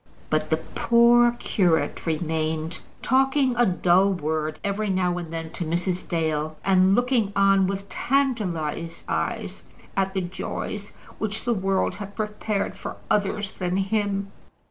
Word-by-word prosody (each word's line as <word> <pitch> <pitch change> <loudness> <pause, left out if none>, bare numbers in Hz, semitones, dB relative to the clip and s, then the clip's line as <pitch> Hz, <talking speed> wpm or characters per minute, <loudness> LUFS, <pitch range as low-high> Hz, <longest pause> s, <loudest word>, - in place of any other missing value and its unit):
But - - +1
the - - +2
poor 235 0 +4
curate 180 -8 0
remained, 160 0 -1 0.2
talking 265 0 +3
a 240 0 +4
dull 185 +2 +3
word 155 -2 -2
every 205 +1 -1
now 180 -2 +1
and 165 -2 -7
then 165 -1 -5
to - - -4
Mrs. 175 +2 -2
Dale, 155 -2 -1
and 190 0 +5
looking 245 -4 +2
on 195 -1 +4
with 195 +1 -3
tantalized 185 - -1
eyes 80 0 -2 0.3
at 195 0 0
the 190 - +1
joys 195 +3 -5 0.3
which 215 0 -2
the 240 - +1
world 195 -2 0
had 205 -1 -8
prepared 210 -2 -2
for 195 - -6 0.2
others 205 -1 0
than 180 0 -2
him. 200 0 -1
195 Hz, 140 wpm, -25 LUFS, 170-210 Hz, 0.3 s, and